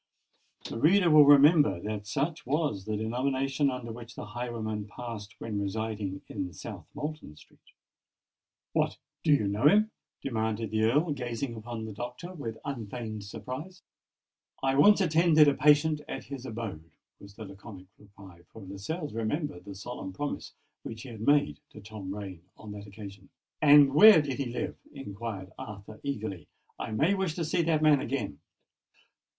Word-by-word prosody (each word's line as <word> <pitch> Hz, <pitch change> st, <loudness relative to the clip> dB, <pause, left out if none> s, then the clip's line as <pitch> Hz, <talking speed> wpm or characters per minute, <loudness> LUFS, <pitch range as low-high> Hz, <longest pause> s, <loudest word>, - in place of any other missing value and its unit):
The -, -, -5 dB
reader 175 Hz, +4 st, +5 dB
will 150 Hz, -1 st, +9 dB
remember 145 Hz, -, +6 dB
that 105 Hz, +2 st, -5 dB
such 150 Hz, +7 st, -2 dB
was 140 Hz, -, -1 dB
the 110 Hz, -1 st, -2 dB
denomination 135 Hz, +5 st, 0 dB
under 125 Hz, -3 st, -5 dB
which 115 Hz, 0 st, -10 dB
the -, -, -6 dB
highwayman 110 Hz, -2 st, -4 dB
passed 110 Hz, -1 st, -8 dB
when 105 Hz, -3 st, -3 dB
residing 100 Hz, -1 st, -3 dB
in 90 Hz, -1 st, -4 dB
South 95 Hz, -3 st, -8 dB
Moulton 150 Hz, -, -6 dB
Street. -, -, -20 dB, 1.1 s
"What! -, -, +1 dB, 0.3 s
do 160 Hz, -, +3 dB
you 125 Hz, -8 st, +4 dB
know 105 Hz, +7 st, +3 dB
him?" 215 Hz, +6 st, +5 dB, 0.3 s
demanded 110 Hz, -3 st, -2 dB
the 110 Hz, 0 st, +2 dB
Earl, 150 Hz, +8 st, +2 dB
gazing 125 Hz, -2 st, -3 dB
upon 115 Hz, 0 st, -6 dB
the 110 Hz, -, -7 dB
doctor 125 Hz, -, -7 dB
with 115 Hz, -10 st, -6 dB
unfeigned 110 Hz, -4 st, -5 dB
surprise. 150 Hz, -, -7 dB, 0.8 s
"I 135 Hz, 0 st, +2 dB
once 205 Hz, +9 st, +6 dB
attended 160 Hz, -3 st, +5 dB
a 145 Hz, -, +5 dB
patient 150 Hz, +1 st, +4 dB
at -, -, -5 dB
his 135 Hz, -2 st, -7 dB
abode," 105 Hz, -9 st, -6 dB, 0.3 s
was 100 Hz, 0 st, -14 dB
the 110 Hz, -, -8 dB
laconic 95 Hz, -1 st, -11 dB
reply: 100 Hz, -4 st, -15 dB
for 110 Hz, -, -11 dB
Lascelles 105 Hz, -, -5 dB
remembered 115 Hz, -, -3 dB
the 100 Hz, -1 st, -8 dB
solemn 100 Hz, -2 st, -7 dB
promise 145 Hz, +9 st, -4 dB, 0.3 s
which 115 Hz, 0 st, -8 dB
he 135 Hz, -, -9 dB
had 110 Hz, -3 st, -9 dB
made 145 Hz, +4 st, +3 dB
to -, -, -12 dB
Tom 100 Hz, -2 st, -8 dB
Rain 95 Hz, -4 st, -7 dB, 0.2 s
on 110 Hz, -, -10 dB
that 105 Hz, 0 st, -8 dB
occasion. 100 Hz, -1 st, -11 dB, 0.3 s
"And 145 Hz, -2 st, +7 dB
where 210 Hz, +3 st, +9 dB
did 145 Hz, -3 st, -2 dB
he 140 Hz, -, -1 dB
live?" 120 Hz, +1 st, -4 dB
inquired 105 Hz, -7 st, -6 dB
Arthur, 110 Hz, -4 st, -9 dB
eagerly. 110 Hz, -, -4 dB, 0.3 s
"I -, -, -4 dB
may 150 Hz, -, +2 dB
wish 190 Hz, -5 st, -1 dB
to 170 Hz, -, -2 dB
see 170 Hz, +3 st, +1 dB
that 160 Hz, -2 st, +1 dB
man 150 Hz, -3 st, +5 dB
again." 105 Hz, -, -3 dB
115 Hz, 160 wpm, -29 LUFS, 105-145 Hz, 1.1 s, will